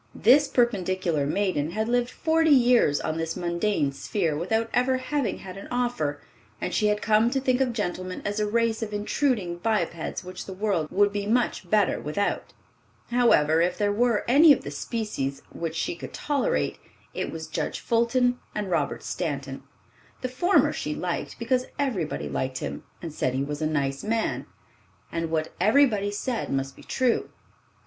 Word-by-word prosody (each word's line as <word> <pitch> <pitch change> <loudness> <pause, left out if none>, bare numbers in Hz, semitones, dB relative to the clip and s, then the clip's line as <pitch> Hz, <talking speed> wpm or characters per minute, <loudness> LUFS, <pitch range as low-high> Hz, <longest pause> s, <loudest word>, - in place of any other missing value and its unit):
This 275 +6 +5
perpendicular 185 - +1
maiden 170 -4 0
had 220 +2 -1
lived 245 0 +1
forty 320 +3 +2
years 245 - +5
on 155 - -2
this 165 +1 -3
mundane 170 -3 0
sphere 165 +2 -1
without 220 +8 0
ever 255 +1 +2
having 255 -3 -1
had 185 0 -9
an 195 - -8
offer, 240 -13 -1 0.4
and - - -3
she 210 - +2
had 210 0 0
come 215 +2 +4
to 270 - 0
think 255 -1 +1
of 255 -2 +2
gentlemen 185 -4 -4
as 205 +1 -1
a 210 - +1
race 230 +1 +1
of 215 -2 -4
intruding 205 -4 0
bipeds 175 -4 -1
which 185 +1 -8
the 190 - -6
world 190 -6 0
would 205 +2 +3
be 205 0 -2
much 240 +3 0
better 210 -3 +2
without. 155 +8 -2 0.6
However, 165 -11 +4
if 180 +1 +1
there 205 -1 +1
were 230 0 +2
any 295 +6 +7
of 280 - +4
the - - -6
species 210 - -3
which 165 -1 -4
she 165 - -1
could - - -9
tolerate, 300 - 0 0.3
it - - -3
was 160 -1 -6
Judge 155 - -3
Fulton 245 +2 +2 0.2
and 205 -3 -3
Robert 170 - 0
Stanton. - - -4 0.6
The 255 - -2
former 350 +10 +3
she - - -3
liked, - - -3
because 255 -1 0
everybody 180 - -1
liked 130 - -2
him, - - -5 0.2
and 165 -3 -5
said 130 -4 -1
he 135 - 0
was 145 +2 -4
a 155 - +1
"nice 140 -3 -1
man, 225 +1 -1 0.6
and 165 -1 -2
what 160 -1 -1
everybody 215 -1 +4
said 230 +4 -3
must 135 0 -2
be - - -14
true." 255 -3 0
205 Hz, 170 wpm, -26 LUFS, 165-245 Hz, 0.6 s, any